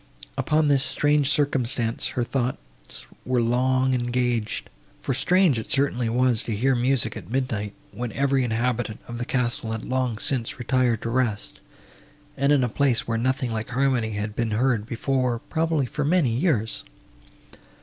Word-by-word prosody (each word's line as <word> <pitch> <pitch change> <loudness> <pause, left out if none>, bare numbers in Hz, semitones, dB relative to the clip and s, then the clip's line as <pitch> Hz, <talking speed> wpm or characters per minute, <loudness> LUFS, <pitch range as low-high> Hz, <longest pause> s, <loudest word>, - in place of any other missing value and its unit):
Upon 155 0 +2
this 140 -2 +3
strange 145 -1 +2
circumstance 130 -5 +1
her 120 - +2
thoughts 120 - -5 0.2
were 125 0 +1
long 130 +2 +2
engaged, 120 -2 -1 0.3
for 135 - -2
strange 155 0 +3
it 110 - -8
certainly 130 -4 +1
was 125 -1 +2
to 110 - -3
hear 130 +6 +2
music 120 -2 +1
at - - -9
midnight, 110 -5 -2 0.2
when 120 +3 -5
every 135 -1 +1
inhabitant 120 -1 -1
of 120 0 -6
the 120 - -2
castle 120 -3 -1
had 110 - -5
long 130 -3 -1
since 115 +2 -1
retired 125 -3 +1
to 115 - -2
rest, 120 -4 -1 0.8
and 140 +1 +2
in 140 -3 +4
a - - +2
place, 125 0 +1
where 115 -1 0
nothing 130 0 0
like 110 0 -3
harmony 125 -3 +1
had 105 +1 -4
been 115 -1 -1
heard 120 -4 +1
before, 125 0 0
probably, 160 +3 -1
for 150 +4 -3
many 155 -4 +2
years. 115 - 0
125 Hz, 160 wpm, -24 LUFS, 115-135 Hz, 0.8 s, in